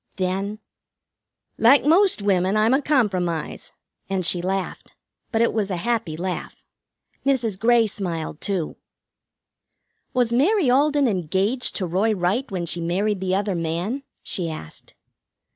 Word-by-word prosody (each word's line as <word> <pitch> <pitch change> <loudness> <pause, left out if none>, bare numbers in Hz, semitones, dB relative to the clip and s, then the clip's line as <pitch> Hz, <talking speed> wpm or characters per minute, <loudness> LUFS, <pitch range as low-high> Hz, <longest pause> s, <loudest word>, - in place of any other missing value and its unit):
Then: 195 +3 -2 1.0
"Like 265 +6 +6
most 345 - +4
women, 190 0 +2
I'm 220 +3 +3
a 270 - +3
compromise," 185 - -1 0.4
and 190 -2 -1
she 175 +2 +2
laughed. 190 +1 -4 0.4
But 225 -1 +2
it 235 - +1
was 210 -3 -1
a 185 - -1
happy 210 -4 -1
laugh. 180 +1 -4 0.7
Mrs. 240 -8 0
Grey 235 +1 +4
smiled 170 -7 -4
too. 190 -6 -2 1.3
"Was 245 -3 +1
Mary 305 - +3
Alden 285 +1 +3
engaged 195 - 0
to 190 - 0
Roy 195 +6 +1
Wright 195 +9 0
when 180 -3 -3
she 170 +1 -2
married 190 +4 0
the 190 0 0
other 200 0 0
man?" 170 +10 -2 0.2
she 175 -3 -2
asked. 80 - -9
200 Hz, 135 wpm, -23 LUFS, 180-240 Hz, 1.3 s, Like